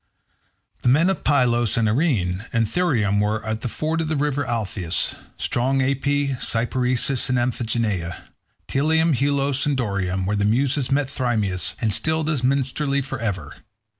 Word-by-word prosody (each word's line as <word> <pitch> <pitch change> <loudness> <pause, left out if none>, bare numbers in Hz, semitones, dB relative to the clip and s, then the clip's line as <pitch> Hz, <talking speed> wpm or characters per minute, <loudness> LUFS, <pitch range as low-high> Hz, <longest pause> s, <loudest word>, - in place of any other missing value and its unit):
The - - +2
men 160 +9 +4
of 190 - -4
Pylos 120 -5 +2
and 115 -1 +2
Arene, 105 - 0
and 115 -1 +2
Thryum 110 - +1
where 105 +1 -1
is 110 0 -2
the - - -3
ford 160 +6 -2
of 160 - -2
the 155 - -1
river 145 0 0
Alpheus; 105 -8 -1 0.2
strong 130 +3 0
Aipy, 140 +2 +1
Cyparisseis, 125 +2 0
and 125 - +2
Amphigenea; 115 -7 -1 0.4
Pteleum, 160 +3 +2
Helos, 140 +1 +1
and 145 -2 +1
Dorium, 95 -5 -1
where 105 +2 0
the 100 - 0
Muses 130 +5 +1
met 140 0 +1
Thamyris, 110 - -1
and 110 -3 0
stilled 155 +8 0
his 145 -5 -1
minstrelsy 140 +2 0
for 135 - -5
ever. 95 -10 -4
125 Hz, 155 wpm, -22 LUFS, 110-140 Hz, 0.4 s, men